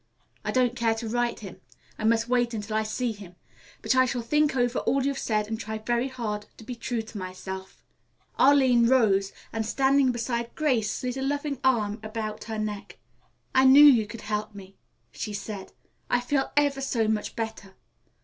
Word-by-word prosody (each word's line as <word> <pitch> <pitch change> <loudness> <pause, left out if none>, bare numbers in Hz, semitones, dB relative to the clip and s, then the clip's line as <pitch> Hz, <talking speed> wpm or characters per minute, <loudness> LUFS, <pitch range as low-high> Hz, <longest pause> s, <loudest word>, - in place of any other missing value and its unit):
I - - -3
don't 250 -1 +2
care 230 -2 +1
to 225 0 -5
write 240 +1 -1
him. 195 -4 -10 0.4
I 215 - -2
must 225 +1 +2
wait 240 -1 +1
until 215 0 -4
I 220 - +2
see 220 +3 -2
him. 200 -4 -11 0.5
But - - +2
I 255 0 +5
shall 245 -2 -2
think 300 +3 +2
over 245 -1 +1
all 270 0 0
you've 275 -1 -1
said 215 -2 0
and 220 0 -4
try 220 0 -4
very 240 +3 -1
hard 215 -5 -4
to - - -12
be 250 - -6
true 235 -1 -3
to 220 -1 -9
myself." 190 +1 -8 0.6
Arline 260 -4 +5
rose 200 -6 +3 0.2
and 225 -1 -1
standing 265 +3 +3
beside 235 0 -3
Grace 255 -9 +1
slid 250 0 -3
a - - -3
loving 285 0 -2
arm 220 -5 +1
about 215 -1 -5
her 220 0 -4
neck. 210 -1 -5 0.6
"I 260 0 +5
knew 275 +3 +9
you 235 -7 +6
could 225 +1 -9
help 210 0 -3
me," 195 -1 -12 0.4
she 210 - -5
said. 200 -1 -6 0.4
"I 245 - +3
feel 270 +2 -1
ever 285 -2 +2
so 235 -5 0
much 215 -1 -2
better. 220 -4 -5
230 Hz, 190 wpm, -26 LUFS, 215-255 Hz, 0.6 s, knew